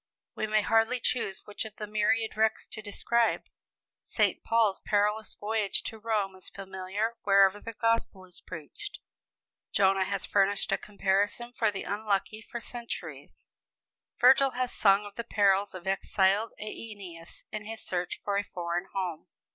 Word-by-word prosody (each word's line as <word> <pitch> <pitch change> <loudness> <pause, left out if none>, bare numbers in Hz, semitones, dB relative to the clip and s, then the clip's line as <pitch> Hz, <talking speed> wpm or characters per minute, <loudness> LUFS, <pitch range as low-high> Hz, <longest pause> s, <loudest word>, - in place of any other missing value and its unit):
We 220 - -2
may 215 0 +2
hardly 225 +3 +3
choose 230 -5 -1
which 210 - -4
of 220 -2 -9
the 210 - -5
myriad 215 +2 +1
wrecks 220 0 +2
to 215 - -8
describe. 230 +2 +1 0.6
St. - - +1
Paul's 225 -4 +3
perilous 210 +1 +1
voyage 210 -1 -1
to 220 - -5
Rome 210 -3 0
is 185 - -7
familiar 195 +4 -3
wherever 195 0 +5
the 230 +2 -7
gospel 230 -4 0
is 180 -2 -10
preached; 185 - -8 0.7
Jonah 195 -1 +4
has 200 -1 -2
furnished 200 0 +2
a - - +2
comparison 205 +4 0
for 225 -2 +2
the 195 -1 -4
unlucky 210 +1 -1
for 235 +2 -7
centuries; 235 0 -7 0.7
Virgil 265 +1 +6
has 255 -1 0
sung 200 0 +4
of 205 - -9
the 235 - -2
perils 200 -3 +2
of 180 -1 -8
exiled 195 +2 +2
Æneas 200 -6 -8
in 215 -1 -5
his 225 +1 -6
search 180 -1 -3
for 200 -1 0
a 200 - +1
foreign 175 -1 -3
home. 185 -3 -3
205 Hz, 155 wpm, -29 LUFS, 195-225 Hz, 0.7 s, Virgil